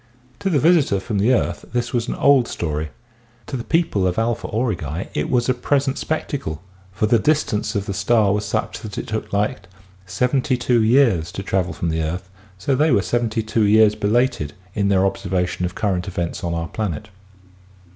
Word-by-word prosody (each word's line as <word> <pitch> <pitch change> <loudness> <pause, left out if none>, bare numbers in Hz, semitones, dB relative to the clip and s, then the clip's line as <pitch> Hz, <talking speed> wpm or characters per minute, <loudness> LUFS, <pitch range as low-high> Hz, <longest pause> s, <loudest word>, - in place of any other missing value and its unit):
To 195 - -1
the 165 - +2
visitor 150 - +3
from 100 +1 -2
the 110 +6 +3
earth 130 - 0
this 120 -1 -1
was 120 -1 0
an - - -2
old 140 -4 +4
story, 75 -2 -3 0.6
to 135 - -5
the 120 - -3
people 160 - +1
of 90 - -2
Alpha 115 0 0
Aurigae 95 - -2
it 75 - -1
was 120 -2 +1
a 130 - +3
present 135 +2 0
spectacle, 135 - -3 0.3
for 95 +3 0
the 115 +2 +3
distance 150 -5 0
of 100 -1 -1
the 100 - -3
star 100 +1 +2
was 105 +1 -1
such 100 - -2
that 105 -3 -8
it - - -3
took 110 0 -4
light 100 -1 -1 0.4
72 125 +3 +1
years 110 - +3
to 100 - -5
travel 95 -2 0
from 85 - -3
the 80 0 -1
earth, 90 +4 -4 0.3
so 100 +9 -1
they 150 +5 +3
were 100 - +3
72 115 -1 0
years 105 0 +5
belated 105 - 0 0.2
in 100 -2 0
their 95 -1 +3
observation 95 -2 -1
of 90 - -4
current 95 -4 -1
events 85 -2 -3
on 85 -1 -1
our 85 0 -2
planet. 105 +1 -4
105 Hz, 185 wpm, -21 LUFS, 95-125 Hz, 0.6 s, years